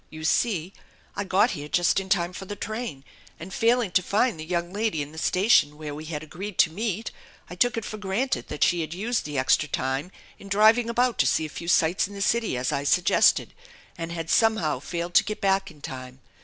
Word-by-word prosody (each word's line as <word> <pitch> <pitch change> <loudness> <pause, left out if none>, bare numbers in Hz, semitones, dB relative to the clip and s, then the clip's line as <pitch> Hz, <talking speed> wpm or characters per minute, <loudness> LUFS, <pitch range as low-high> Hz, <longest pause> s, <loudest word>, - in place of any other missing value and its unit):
"You 155 0 -9
see, 185 +1 0 0.4
I 200 - -2
got 195 +5 +3
here 145 -4 -6
just 175 +3 +2
in 190 0 -7
time 180 -2 +1
for 195 - -7
the 205 - -6
train, 215 - -5 0.4
and 180 +4 -9
failing 230 -3 +2
to 185 - +3
find 205 +1 +1
the - - -5
young 175 +2 -3
lady 205 -8 -1
in 145 - -10
the 160 - -8
station 180 -5 +3
where 150 -1 -6
we 155 +2 -8
had 155 -1 -5
agreed 180 +5 -7
to 160 - +4
meet, 215 +3 -3 0.4
I - - -5
took 235 +6 +1
it 225 - -3
for 215 - -6
granted 210 +6 -2
that 150 - -1
she 175 -1 +2
had 160 +1 -5
used 225 +5 -1
the 150 -2 -4
extra 135 +3 +2
time 135 +8 -2 0.3
in 200 - -12
driving 220 +3 +4
about 245 +1 +1
to - - +4
see 160 - +1
a - - -6
few 170 +3 -8
sights 170 +2 +3
in 200 - -11
the 200 - -6
city, 225 - +1
as 125 0 -1
I 140 - -1
suggested, 175 +5 +3 0.4
and 165 0 -5
had 165 -1 -4
somenow 215 - +2
failed 170 +2 -4
to - - +6
get 210 +1 -5
back 195 0 +1
in 155 -4 -17
time. 130 -1 -8
180 Hz, 225 wpm, -25 LUFS, 155-215 Hz, 0.4 s, to